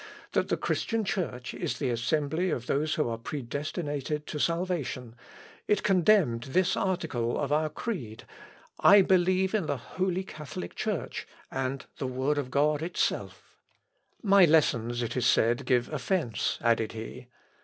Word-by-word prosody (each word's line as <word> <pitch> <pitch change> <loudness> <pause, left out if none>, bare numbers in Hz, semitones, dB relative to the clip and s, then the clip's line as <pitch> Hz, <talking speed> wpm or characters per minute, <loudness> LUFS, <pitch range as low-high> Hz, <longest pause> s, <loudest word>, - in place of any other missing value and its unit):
that - - +1
the - - +1
Christian 225 -2 -1
Church 125 -11 -3
is - - -3
the 130 -4 -1
assembly 150 +9 0
of 120 -7 -2
those 155 +4 0
who 150 - +1
are 115 -1 -3
predestinated 145 +3 -4
to 150 - -5
salvation 165 -9 -1 0.5
it 210 -2 +2
condemned 185 - +4
this 180 +7 +2
article 160 -11 -1
of 145 -1 -2
our 155 +1 +2
creed, 145 - -5 0.6
I 200 -1 +8
believe 185 +1 +3
in 200 -7 0
the 145 - -1
holy 185 +8 -2
Catholic 145 - -7
Church; - - -3 0.2
and 135 0 -3
the 130 - -2
Word 130 +3 0
of 135 -3 -4
God 145 +2 +2
itself. 170 +2 -3 0.6
My 200 -2 +6
lessons, 120 -7 +3
it 115 - -3
is 125 - +2
said, 120 +2 +2
give 125 -1 +3
offence," 140 - -1
added 115 -2 +2
he. 110 0 -8
150 Hz, 145 wpm, -28 LUFS, 125-180 Hz, 0.6 s, I